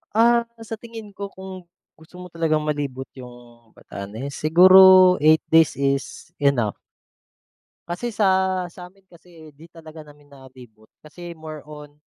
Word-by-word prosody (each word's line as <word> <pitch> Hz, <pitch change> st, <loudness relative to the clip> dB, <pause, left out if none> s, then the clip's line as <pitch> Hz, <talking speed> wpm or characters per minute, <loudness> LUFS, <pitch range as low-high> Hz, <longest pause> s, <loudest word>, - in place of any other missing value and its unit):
Ah, 235 Hz, +1 st, +3 dB, 0.2 s
sa 225 Hz, -, -6 dB
tingin 225 Hz, -3 st, -11 dB
ko 200 Hz, +1 st, -6 dB
kung 190 Hz, -1 st, -11 dB, 0.3 s
gusto 160 Hz, +2 st, -20 dB
mo 180 Hz, -, -10 dB
talagang 160 Hz, -2 st, -1 dB
malibot 140 Hz, -3 st, -4 dB
yung 120 Hz, -2 st, -15 dB
Batanes, 110 Hz, +8 st, -9 dB
siguro 185 Hz, +3 st, +6 dB
8 155 Hz, +1 st, +4 dB
days 160 Hz, -1 st, +4 dB
is 140 Hz, 0 st, -3 dB
enough. 125 Hz, -7 st, 0 dB, 1.1 s
Kasi 180 Hz, +8 st, -5 dB
sa 205 Hz, -2 st, 0 dB, 0.4 s
sa 180 Hz, +1 st, -13 dB
akin 195 Hz, -1 st, -31 dB
kasi 165 Hz, -4 st, -18 dB
di 155 Hz, -, -18 dB
talaga 160 Hz, -1 st, -13 dB
namin 145 Hz, -1 st, -20 dB
nalibot 125 Hz, -6 st, -18 dB
kasi 175 Hz, +3 st, -12 dB
more 155 Hz, -2 st, -10 dB
on 150 Hz, -1 st, -13 dB
155 Hz, 140 wpm, -21 LUFS, 140-180 Hz, 1.1 s, siguro